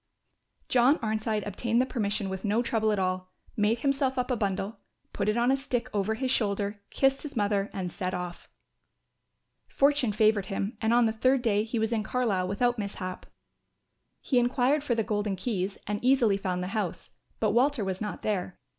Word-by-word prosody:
John 255 +5 +4
Arnside 215 -2 -1
obtained 230 +3 0
the 255 - +3
permission 210 -5 -2
with 190 -1 -5
no 215 +3 +1
trouble 220 -2 +1
at 210 - 0
all, 185 -1 -1 0.2
made 220 +2 +1
himself 275 -1 +1
up 250 +1 0
a - - +2
bundle, 200 0 -2 0.3
put 200 0 0
it 215 - +1
on 240 +2 +3
a - - +4
stick 255 -3 -3
over 210 +1 0
his 260 +2 -1
shoulder, 205 -3 0
kissed 270 0 +2
his 300 -2 -6
mother 205 -2 +1
and 185 -3 -4
set 185 0 -3
off. 180 -1 -6 1.2
Fortune 280 -4 +2
favoured 215 -1 +2
him 200 +2 -3
and 220 0 +2
on 240 0 +5
the 220 - +2
third 255 +3 +2
day 210 -3 +2
he 230 +2 -3
was 220 +1 0
in 220 - +1
Carlisle 215 -6 0
without 240 +5 +1
mishap. 195 -2 -5 0.9
He 255 - +2
enquired 255 +4 +2
for 250 -5 0
the 225 - +1
Golden 205 -2 -1
Keys 195 -1 -2
and 210 +2 -3
easily 250 -5 +4
found 185 -2 -2
the 180 - -4
house, 205 -6 -3 0.3
but 215 -2 +2
Walter 245 -1 +2
was 190 0 -3
not 210 -1 -4
there. 190 -4 -2
215 Hz, 190 wpm, -28 LUFS, 200-245 Hz, 1.2 s, on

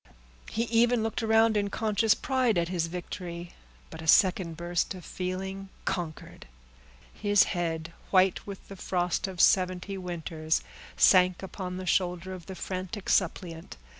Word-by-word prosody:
He 225 - -1
even 235 0 +3
looked 225 +1 -2
around 225 0 +4
in 205 -1 +1
conscious 215 0 +2
pride 255 -6 +1
at 170 0 +1
his 175 -3 -1
victory; 175 0 -6 0.4
but - - -8
a 160 - -8
second 180 -2 +4
burst 175 +2 -1
of 180 - -10
feeling 190 +1 -4 0.2
conquered. 170 - -4 0.7
His 205 -1 +4
head, 165 -1 -3 0.2
white 190 0 +3
with 200 -1 -8
the 195 - -9
frost 180 0 -1
of 185 -2 -8
seventy 185 +1 +3
winters, 165 -3 -2 0.3
sank 185 -1 +5
upon 185 -1 -5
the 185 - -5
shoulder 180 +1 0
of 180 -3 -10
the 190 - -7
frantic 185 +2 -5
suppliant. 165 - -1
185 Hz, 145 wpm, -28 LUFS, 175-200 Hz, 0.7 s, sank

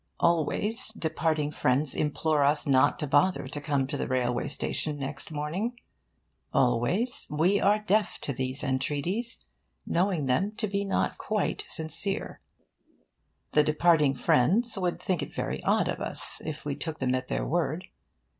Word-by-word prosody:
Always, 170 - +1
departing 155 -4 -1
friends 135 0 +1
implore 150 0 +1
us 145 +1 +3
not 130 -2 +4
to - - -2
bother 145 +6 +2
to 145 - -5
come 140 -3 0
to 145 +2 -4
the - - -2
railway 125 -2 0
station 150 +1 -1
next 140 0 -5
morning. 165 +11 -3 0.7
Always, 180 - +1
we 170 +7 +2
are 205 +2 +4
deaf 210 -1 0
to 140 - -2
these 130 +2 -3
entreaties, 150 - -2 0.4
knowing 175 -4 +1
them 180 +12 +1
to 215 0 -2
be 200 0 -1
not 195 - 0
quite 215 -2 -1
sincere. 165 +5 -2 1.1
The 150 - +5
departing 150 -2 +3
friends 190 - +3
would 180 -3 -1
think 185 -3 -1
it - - -6
very - - -3
odd - - +2
of - - -2
us - - -1
if 155 -2 -6
we 145 - -1
took 160 +2 -5
them 130 -3 0
at 130 0 -2
their - - -1
word. 170 +2 -1
155 Hz, 155 wpm, -28 LUFS, 140-195 Hz, 1.1 s, The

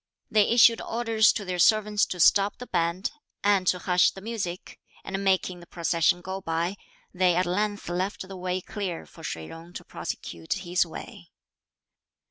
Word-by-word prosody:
They 210 -2 +4
issued 235 -1 +6
orders 225 -1 +2
to 205 - -4
their 180 -1 -3
servants 210 +2 +4
to 180 - -5
stop 200 +4 +4
the 250 - -8
band, 170 -1 -1 0.3
and 200 -2 +3
to 180 - +3
hush 180 0 +3
the - - -10
music, 195 -5 -5 0.2
and 195 +1 -4
making 185 -2 +1
the 175 - -14
procession 170 0 +1
go 190 +1 -5
by, 170 +2 -1 0.4
they 180 -1 +3
at 180 +1 +2
length 205 +3 -1
left 185 +2 -3
the 195 - -8
way 185 0 -2
clear 190 -4 -5
for 165 - -16
Shih 80 - -5
Jung 165 - -11
to - - -8
prosecute 80 -1 -5
his 175 0 0
way. 160 - -10
185 Hz, 170 wpm, -26 LUFS, 175-205 Hz, 0.4 s, issued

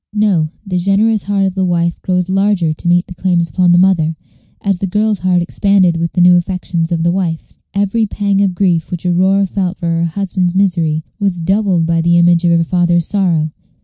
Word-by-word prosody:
No; 200 -7 +1 0.2
the 180 -2 -2
generous 205 +4 +1
heart 200 0 0
of 190 - -1
the 190 0 -1
wife 170 -1 -1
grows 180 -1 -1
larger 190 -4 +1
to 155 - -7
meet 175 +1 +2
the - - -10
claims 175 -1 0
upon 180 +1 +1
the 175 - +4
mother, 175 -4 +2 0.4
as 195 -3 -1
the 195 - -2
girl's 210 +1 0
heart 180 -1 +1
expanded 185 -1 +1
with 170 0 -3
the 180 - +1
new 180 0 +6
affections 175 -2 -3
of 165 -1 -1
the 170 - +2
wife. 175 -3 -3 0.2
Every 205 +3 0
pang 200 -1 -1
of 190 -3 0
grief 175 -4 0
which 175 0 -6
Aurora 190 +3 +2
felt 190 -1 -3
for 175 - -7
her 165 0 0
husband's 180 0 -2
misery 170 -5 0 0.2
was 195 -4 -1
doubled 190 -1 +1
by 165 0 0
the 170 +1 +2
image 170 0 +3
of - - +3
her 165 - +1
father's 175 0 +1
sorrow. 170 -6 0
180 Hz, 210 wpm, -15 LUFS, 170-195 Hz, 0.4 s, new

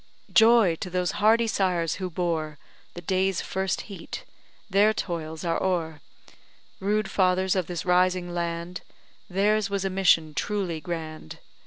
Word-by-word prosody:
"Joy, 225 -7 +6
to 180 - -5
those 180 0 0
hardy 225 +2 +5
sires 180 -7 0
who 185 - -2
bore 160 -3 -2 0.4
The 175 - -7
day's 190 +1 +1
first 190 0 -2
heat 200 -3 -8 0.4
their 205 +2 +3
toils 160 -4 -4
are 165 -1 0
o'er; 165 -5 -1 0.8
Rude 210 +1 0
fathers 185 0 +2
of 185 -3 0
this 175 -2 -4
rising 180 0 +2
land, 170 +1 -3 0.5
Theirs 205 +2 +2
was 200 -1 -2
a 195 - -1
mission 170 -5 +3
truly 185 -4 -2
grand. 155 - -6
180 Hz, 140 wpm, -26 LUFS, 170-195 Hz, 0.8 s, Joy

